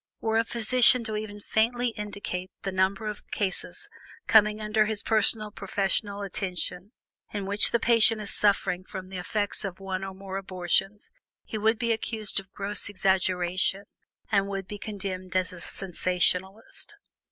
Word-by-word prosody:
Were 225 0 +1
a - - +3
physician 240 +2 +5
to 220 -1 -4
even 210 -1 -5
faintly 240 +4 +1
indicate 200 -4 -5
the 195 - -2
number 190 +3 0
of 210 -1 -6
cases 195 -2 -3 0.4
coming 210 -1 +5
under 215 0 +1
his 215 -2 0
personal 215 -1 +3
professional 200 0 -2
attention, 185 0 -4 0.4
in 205 -2 -4
which 200 +2 +3
the 235 - +1
patient 225 -1 +5
is 210 -1 -1
suffering 200 -3 +3
from 185 0 -8
the 190 -1 -6
effects 205 +4 -1
of 195 -2 -5
one 190 -1 -4
or 195 0 -6
more 195 0 -6
abortions, 195 +2 -2 0.3
he 215 - -5
would 220 +2 +2
be 235 0 0
accused 220 -2 -1
of 195 0 -13
gross 200 0 +1
exaggeration, 185 -1 +1 0.5
and 200 -2 +2
would 195 -1 -4
be 205 - -7
condemned 185 -3 -6
as 185 0 0
a 175 - -10
sensationalist. 190 - -1
200 Hz, 155 wpm, -27 LUFS, 190-215 Hz, 0.5 s, physician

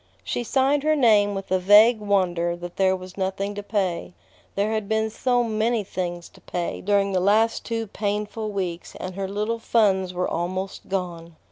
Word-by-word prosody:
She 240 - -2
signed 270 +4 +2
her 310 +1 +2
name 210 -7 +4
with 195 -1 -6
a 185 - +3
vague 210 +5 +6
wonder 180 -4 +1
that 175 0 -9
there 190 -1 +3
was 185 0 -10
nothing 195 +2 -2
to 205 - -5
pay. 195 -4 -2 0.4
There 205 +2 0
had 215 -2 -2
been 220 0 0
so 245 +2 +1
many 225 0 0
things 175 -2 -4
to - - -20
pay 175 -1 -4
during 200 0 +2
the 185 - +1
last 215 +4 +2
two 230 -1 -3
painful 210 +1 -3
weeks, 180 -4 -4
and 185 0 -6
her 195 +1 -3
little 210 +4 -2
funds 195 -5 +2
were 180 0 -1
almost 185 +3 -4
gone. 170 -3 -4
200 Hz, 180 wpm, -24 LUFS, 185-220 Hz, 0.4 s, vague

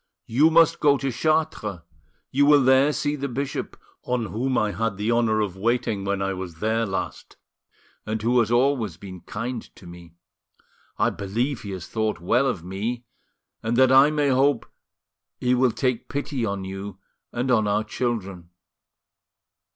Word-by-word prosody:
You 140 +8 +4
must 165 0 +4
go 145 -1 +4
to 135 -1 -2
Chartres, 155 - -1 0.5
you 140 +2 +3
will 145 -2 +6
there 130 +3 +5
see 145 0 -1
the 140 -1 -3
bishop, 135 +2 -4 0.2
on 125 -2 -1
whom 125 +5 -1
I 105 -1 +1
had 105 +1 -2
the 105 +3 0
honour 115 -2 +2
of 100 -4 -2
waiting 110 -1 -1
when 100 0 -1
I 95 0 -1
was 90 -3 -6
there 110 +5 0
last, 95 - -5 0.7
and 110 +1 -3
who 120 +3 +2
has 115 -2 +2
always 120 - +1
been 95 -3 -10
kind 115 +2 -5
to - - -15
me; 85 -1 -13 0.8
I - - +2
believe 120 +7 -2
he 100 - -8
has 90 -3 -6
thought 110 -3 -2
well 120 +10 +2
of 85 - -2
me, 110 +7 -4 0.6
and 115 +1 -1
that 130 0 +5
I 135 +2 +7
may 150 -2 +1
hope 135 -1 +2 0.7
he 125 0 +1
will 125 0 +3
take 125 -1 -2
pity 140 -3 -3
on 100 -1 -3
you 95 0 -7 0.3
and 125 +2 -1
on 110 -4 +3
our 105 +1 +1
children." 100 -7 -4
115 Hz, 165 wpm, -24 LUFS, 100-130 Hz, 0.8 s, I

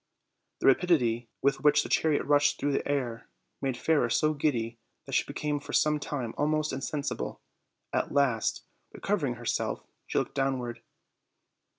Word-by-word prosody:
The - - -1
rapidity 125 -7 +3
with 140 0 +2
which 150 0 +5
the - - -5
chariot 155 -2 +2
rushed 145 0 +3
through 145 - 0
the 135 - -1
air 125 -5 -2 0.3
made 135 -3 -1
Fairer 145 -4 +2
so 155 +5 +2
giddy 120 -6 -1 0.3
that - - -9
she - - +3
became 150 -1 -2
for 145 - -9
some 150 0 +3
time 130 -6 -4
almost 155 +1 +1
insensible; 140 +2 -3 0.5
at - - 0
last, 135 -6 +1 0.3
recovering 155 -12 -1
herself, 120 -1 -2 0.2
she - - -2
looked - - 0
downward. 130 -3 -1
140 Hz, 150 wpm, -29 LUFS, 120-150 Hz, 0.5 s, which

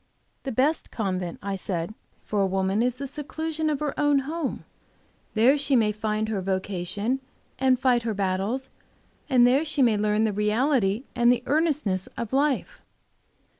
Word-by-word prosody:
"The 270 - -2
best 280 +7 +1
convent," 185 -6 -3
I 200 0 -2
said, 180 -1 -3 0.3
"for 205 -1 -1
a 195 - +3
woman 190 +2 0
is 245 0 +1
the 275 +2 -5
seclusion 310 +3 -3
of 295 -2 -1
her 295 -2 -1
own 290 -2 +3
home. 315 -1 -3 0.7
There 255 +7 +5
she 280 -1 +2
may 220 -3 +3
find 215 0 -2
vocation 195 +3 -2 0.4
and 260 -1 +3
fight 255 -2 +3
her 225 -2 -2
battles, 200 +7 -1 0.6
and 250 -3 +6
there 260 +5 +4
she 300 -3 +1
may 225 -4 +4
learn 210 +1 +1
the 215 -2 +1
reality 215 +1 +1
and 240 0 +5
the 245 -1 0
earnestness 290 - +1
of 235 +1 -4
life." 280 0 0
235 Hz, 160 wpm, -26 LUFS, 205-275 Hz, 0.7 s, and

